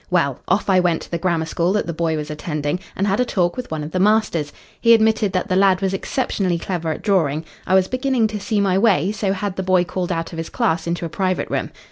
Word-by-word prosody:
Well, 140 Hz, -7 st, +1 dB
off 195 Hz, +3 st, +1 dB
I 190 Hz, -2 st, +4 dB
went 175 Hz, -2 st, +1 dB
to -, -, -13 dB
the 170 Hz, -, -1 dB
grammar 170 Hz, -2 st, 0 dB
school 170 Hz, +3 st, 0 dB
that 210 Hz, -, 0 dB
the 170 Hz, -, -3 dB
boy 160 Hz, -1 st, -1 dB
was 150 Hz, 0 st, -5 dB
attending, 150 Hz, +1 st, -3 dB, 0.2 s
and 195 Hz, -, 0 dB
had 200 Hz, +2 st, +1 dB
a -, -, +4 dB
talk 180 Hz, -7 st, 0 dB
with 250 Hz, -1 st, -6 dB
one 155 Hz, -1 st, -3 dB
of 150 Hz, -, -6 dB
the 185 Hz, -, -1 dB
masters. 200 Hz, -7 st, +2 dB, 0.3 s
He 230 Hz, 0 st, +6 dB
admitted 220 Hz, -2 st, +2 dB
that 185 Hz, +2 st, 0 dB
the 185 Hz, -, 0 dB
lad 190 Hz, -1 st, +4 dB
was 195 Hz, -1 st, -1 dB
exceptionally 195 Hz, -4 st, -1 dB
clever 170 Hz, -1 st, -3 dB
at -, -, -6 dB
drawing. 160 Hz, -6 st, +1 dB, 0.2 s
I 185 Hz, -, +3 dB
was 190 Hz, -1 st, +4 dB
beginning 255 Hz, -1 st, +1 dB
to 210 Hz, -1 st, -4 dB
see 210 Hz, +1 st, -1 dB
my 195 Hz, -1 st, +2 dB
way, 195 Hz, -4 st, +3 dB
so 205 Hz, -2 st, -1 dB
had 195 Hz, 0 st, -3 dB
the -, -, 0 dB
boy 185 Hz, -1 st, +3 dB
called 180 Hz, 0 st, -3 dB
out 165 Hz, -1 st, -2 dB
of -, -, -6 dB
his 165 Hz, -, -4 dB
class 165 Hz, +1 st, 0 dB
into 170 Hz, 0 st, -2 dB
a -, -, -4 dB
private 185 Hz, +2 st, -1 dB
room. -, -, -1 dB
185 Hz, 260 wpm, -20 LUFS, 165-200 Hz, 0.3 s, He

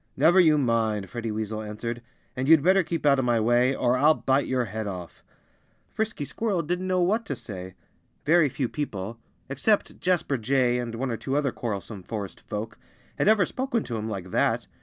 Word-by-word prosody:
"Never 165 Hz, +6 st, +5 dB
you 160 Hz, -4 st, +6 dB
mind," 110 Hz, -6 st, 0 dB
Freddie 120 Hz, -2 st, -4 dB
Weasel 110 Hz, 0 st, -3 dB
answered. 115 Hz, +3 st, -5 dB, 0.3 s
"And 130 Hz, +1 st, -2 dB
you'd 160 Hz, -2 st, +6 dB
better 190 Hz, +3 st, +5 dB
keep 170 Hz, -2 st, -3 dB
out 140 Hz, -2 st, +5 dB
of 130 Hz, -, 0 dB
my 120 Hz, -2 st, +2 dB
way, 120 Hz, +4 st, +3 dB
or 125 Hz, 0 st, +2 dB
I'll 150 Hz, +4 st, +5 dB
bite 135 Hz, +1 st, +1 dB
your 125 Hz, -2 st, 0 dB
head 110 Hz, +1 st, -4 dB
off." 90 Hz, -3 st, -7 dB, 0.7 s
Frisky 220 Hz, -9 st, -2 dB
Squirrel 200 Hz, 0 st, -1 dB
didn't 180 Hz, +4 st, -2 dB
know 185 Hz, -1 st, +1 dB
what 215 Hz, +6 st, +1 dB
to -, -, -2 dB
say. 95 Hz, -3 st, -8 dB, 0.5 s
Very 160 Hz, 0 st, +4 dB
few 130 Hz, 0 st, -2 dB
people 115 Hz, -6 st, -5 dB, 0.3 s
except 170 Hz, +11 st, 0 dB
Jasper 175 Hz, -7 st, 0 dB
Jay 125 Hz, +1 st, +2 dB
and 120 Hz, -2 st, -4 dB
one 130 Hz, +2 st, -2 dB
or 115 Hz, -, -2 dB
two 135 Hz, +4 st, -2 dB
other 140 Hz, -3 st, +1 dB
quarrelsome 105 Hz, -4 st, -5 dB
forest 100 Hz, +1 st, -6 dB
folk 110 Hz, +1 st, -5 dB, 0.4 s
had -, -, +2 dB
ever 210 Hz, -3 st, +5 dB
spoken 255 Hz, 0 st, -2 dB
to 120 Hz, -, -5 dB
him 110 Hz, +1 st, -4 dB
like 95 Hz, -3 st, -6 dB
that. -, -, +1 dB
125 Hz, 195 wpm, -26 LUFS, 110-160 Hz, 0.7 s, you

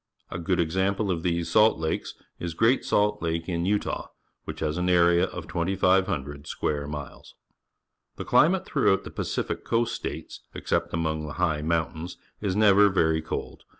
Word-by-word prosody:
A -, -, -4 dB
good 90 Hz, +1 st, 0 dB
example 95 Hz, +4 st, 0 dB
of 85 Hz, -2 st, -2 dB
these 85 Hz, -1 st, -1 dB
salt 110 Hz, +1 st, +5 dB
lakes 80 Hz, 0 st, -3 dB, 0.2 s
is 85 Hz, -1 st, -4 dB
Great 115 Hz, +8 st, +3 dB
Salt 105 Hz, 0 st, +1 dB
Lake 80 Hz, 0 st, -2 dB
in 85 Hz, 0 st, -1 dB
Utah, 105 Hz, +1 st, -1 dB, 0.4 s
which -, -, -6 dB
has 75 Hz, +2 st, -1 dB
an 90 Hz, +1 st, 0 dB
area 85 Hz, -1 st, +4 dB
of -, -, -8 dB
2,500 85 Hz, -6 st, 0 dB
square 70 Hz, -1 st, -2 dB
miles. 75 Hz, -2 st, -8 dB, 0.8 s
The -, -, -6 dB
climate 185 Hz, +4 st, +4 dB
throughout 110 Hz, -9 st, +2 dB
the -, -, -9 dB
PacifiaJIlQast__ 115 Hz, 0 st, -1 dB
States, -, -, -6 dB, 0.2 s
except -, -, -1 dB
among 80 Hz, -2 st, -2 dB
the 75 Hz, -, -6 dB
high 80 Hz, -4 st, 0 dB
mountains, 80 Hz, +2 st, -2 dB, 0.2 s
is__ 100 Hz, -3 st, -1 dB
never 105 Hz, -1 st, +6 dB
very 80 Hz, -4 st, +2 dB
cold. 80 Hz, -, -6 dB
85 Hz, 155 wpm, -26 LUFS, 80-100 Hz, 0.8 s, never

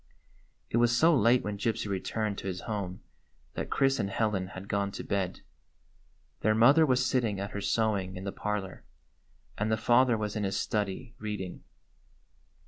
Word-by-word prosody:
It -, -, +1 dB
was 120 Hz, 0 st, +3 dB
so 165 Hz, +4 st, +5 dB
late 120 Hz, 0 st, +4 dB
when 105 Hz, -1 st, -4 dB
Gypsy 110 Hz, 0 st, -1 dB
returned 100 Hz, +2 st, -2 dB
to -, -, -6 dB
his 95 Hz, -1 st, -3 dB
home 100 Hz, -4 st, -4 dB, 0.5 s
that -, -, -4 dB
Chris 135 Hz, 0 st, +2 dB
and 100 Hz, -, 0 dB
Helen 100 Hz, -3 st, 0 dB
had 95 Hz, 0 st, -9 dB
gone 100 Hz, -1 st, 0 dB
to -, -, -5 dB
bed. 95 Hz, -2 st, -2 dB, 1.0 s
Their 110 Hz, +1 st, +2 dB
mother 140 Hz, +8 st, +6 dB
was 130 Hz, -1 st, +2 dB
sitting 115 Hz, -6 st, 0 dB
at 100 Hz, +1 st, -4 dB
her 100 Hz, -, -4 dB
sewing 100 Hz, -4 st, 0 dB
in 90 Hz, -, -7 dB
the 100 Hz, -, -3 dB
parlor, 105 Hz, -3 st, -4 dB, 0.8 s
and 110 Hz, +2 st, 0 dB
the 110 Hz, -, +2 dB
father 120 Hz, +1 st, +4 dB
was 105 Hz, 0 st, -3 dB
in 105 Hz, -, -1 dB
his 100 Hz, 0 st, -1 dB
study 105 Hz, +2 st, -2 dB
reading. 105 Hz, -4 st, -5 dB
105 Hz, 170 wpm, -29 LUFS, 100-115 Hz, 1.0 s, mother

